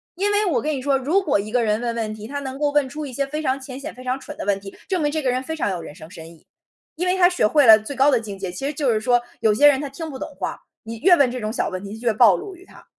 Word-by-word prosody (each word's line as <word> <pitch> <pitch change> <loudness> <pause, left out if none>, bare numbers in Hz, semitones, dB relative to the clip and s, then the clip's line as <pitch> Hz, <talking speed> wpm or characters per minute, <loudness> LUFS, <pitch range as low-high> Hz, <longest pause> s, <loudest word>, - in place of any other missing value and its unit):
因 400 +3 0
为 415 +1 +2
我 275 - +1
跟 305 0 -1
你 265 - -4
说， 275 0 +2
如 300 +9 +1
果 300 - +1
一 210 +2 -5
个 245 0 +2
人 215 -1 +1
问 235 -1 -3
问 220 -2 -3
题， 215 0 -9
他 285 +3 -4
能 265 -1 -6
够 295 -1 +1
问 290 -2 +1
出 300 +3 -6
一 265 - -8
些 275 +3 -1
非 300 +3 -4
常 270 -2 -1
浅 260 -1 -8
显、 275 - -7
非 255 - -11
常 255 +1 -2
蠢 - - -9
的 - - -6
问 200 -1 +1
题， 195 0 -11
证 370 -3 0
明 295 -1 +1
这 315 - -2
个 265 - 0
人 255 +1 -1
非 320 +4 -4
常 310 - -1
有 180 -3 -3
人 150 - -10
生 155 - -12
深 165 -2 -11
意。 165 - -20 0.5
因 355 +3 -2
为 365 - +2
他 360 -1 +5
学 360 -10 +1
会 290 +4 +4
了 220 -1 +9
最 220 +6 -7
高 270 +2 +4
的 250 - +3
境 205 -3 -8
界， 190 -2 -4
其 180 +10 -6
实 290 - -2
就 280 -3 0
是 215 - +1
说， 245 +2 +2 0.2
有 220 -1 +3
些 290 +8 +6
人 280 -2 +4
他 285 - -4
听 320 +4 -7
不 270 - -7
懂 295 +1 -8
话， - - -4 0.2
你 225 +1 -7
越 355 +3 +6
问 280 -6 +3
这 250 - -4
种 215 -1 -4
小 - - -1
问 185 +1 -6
题 200 +2 -7
越 240 -2 +2
暴 215 -4 +6
露 380 - -7
于 365 +1 -17
他。 - - -17
260 Hz, 370 characters per minute, -22 LUFS, 220-295 Hz, 0.5 s, 了